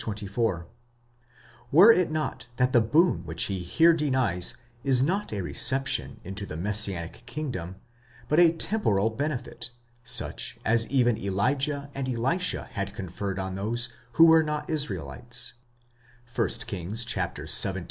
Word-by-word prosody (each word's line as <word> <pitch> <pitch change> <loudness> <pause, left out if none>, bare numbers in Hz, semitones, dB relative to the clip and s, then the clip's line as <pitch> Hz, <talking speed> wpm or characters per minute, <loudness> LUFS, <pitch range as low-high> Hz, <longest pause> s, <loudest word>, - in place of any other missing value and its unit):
24), 100 -4 -2 1.1
were 185 +10 +8
it 180 -5 +2
not 155 -4 -4
that 125 +2 +1
the 120 - +5
boon 130 - +2
which 80 0 0
he 95 -2 -2
here 160 - +3
denies 130 - 0 0.3
is 130 -2 +3
not 195 +8 -1
a 100 -3 -3
reception 130 +8 +1
into 95 +3 -4
the 80 -5 -7
messianic 95 -3 +1
kingdom, 120 - -5 0.5
but 150 - +2
a 170 -2 +6
temporal 135 - 0
benefit, 140 -1 -3 0.3
such 120 0 -3
as 115 +1 +2
even 120 -4 +2
Elijah 140 +9 -1
and 135 -1 -4
Elisha 135 +10 0
had 100 0 -4
conferred 95 +1 -5
on 95 -1 -4
those 115 +5 -1 0.2
who 165 - +7
were 160 0 +6
not 150 -1 -3
Israelites 115 - -3 0.8
(1 - - +1 0.2
Kings 100 +5 -2
xvii. 95 -6 +2
115 Hz, 135 wpm, -26 LUFS, 100-145 Hz, 1.1 s, were